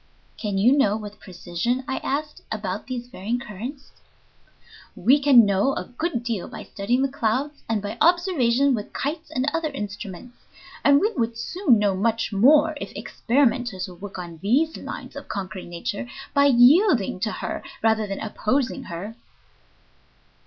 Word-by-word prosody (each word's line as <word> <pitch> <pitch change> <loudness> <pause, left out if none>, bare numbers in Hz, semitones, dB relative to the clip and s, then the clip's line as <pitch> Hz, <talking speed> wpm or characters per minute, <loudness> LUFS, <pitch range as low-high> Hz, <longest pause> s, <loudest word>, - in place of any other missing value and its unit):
"Can 205 -3 -3
you 240 +8 +5
know 215 -7 +3
with 210 -1 -9
precision," 185 +7 -3
I 265 - -2
asked, 295 +2 -3
"about - - -4
these 245 -2 -4
varying 235 0 -3
currents?" 245 +4 -8 1.0
"We 275 +5 +4
can 265 -5 +7
know 200 +7 +2
a - - -3
good 250 -1 -3
deal 230 -6 -3
by - - -8
studying 240 +6 -1
the - - +3
clouds 270 +3 -2
and 215 -3 0
by 205 - -5
observations 285 -7 +3
with 210 -2 -7
kites 305 +3 -3
and 265 -4 -1
other 330 -1 0
instruments. 210 -2 -7 0.5
And 280 0 +6
we 425 +7 +1
would 230 -2 -1
soon 345 - +2
know 205 -1 +2
much 225 +3 0
more 290 +10 +5
if - - -5
experimenters 245 -6 0
would 180 -1 -13
work 200 -2 -7
on 170 -3 -8
these 285 +11 +2
lines - - -8
of - - -8
conquering 190 -2 -5
nature 205 +7 -4 0.2
by 280 -1 +4
yielding 260 - +5
to 215 +2 -1
her - - -4 0.2
rather 220 -1 +2
than 195 - -4
opposing 255 +5 -1
her." 190 +7 -6
235 Hz, 160 wpm, -24 LUFS, 205-280 Hz, 1.0 s, can